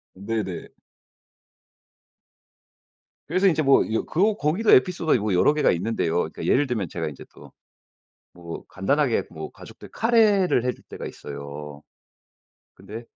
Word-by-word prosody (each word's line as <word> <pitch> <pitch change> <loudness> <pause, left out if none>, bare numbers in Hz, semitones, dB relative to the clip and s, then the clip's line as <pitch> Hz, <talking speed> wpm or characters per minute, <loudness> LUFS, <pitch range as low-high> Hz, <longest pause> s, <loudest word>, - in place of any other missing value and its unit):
네네. 100 -2 -4 2.6
그래서 185 +5 +1
인제 160 -3 +2
뭐 140 -2 +5
이 110 - -1
그 205 +5 +2
거기도 170 +10 +1
에피소드가 160 +3 +4
요게 105 -3 -1
여러 145 +11 +4
개가 150 - +3
있는데요. 90 -2 -1
그러니까 80 -2 -2
예를 145 +2 +3
들면 110 -8 -2
제가 80 0 -4
이제 70 - -11
또 - - -15 0.8
뭐 85 -1 -9
간단하게 125 +7 +1
뭐 80 -1 -7
가족들 - - -13
카레를 210 - +3
해줄 125 - -3
때가 - - -8
있어요. 70 +1 -8 0.9
근데 105 +5 -9
115 Hz, 285 characters per minute, -24 LUFS, -, 2.6 s, 뭐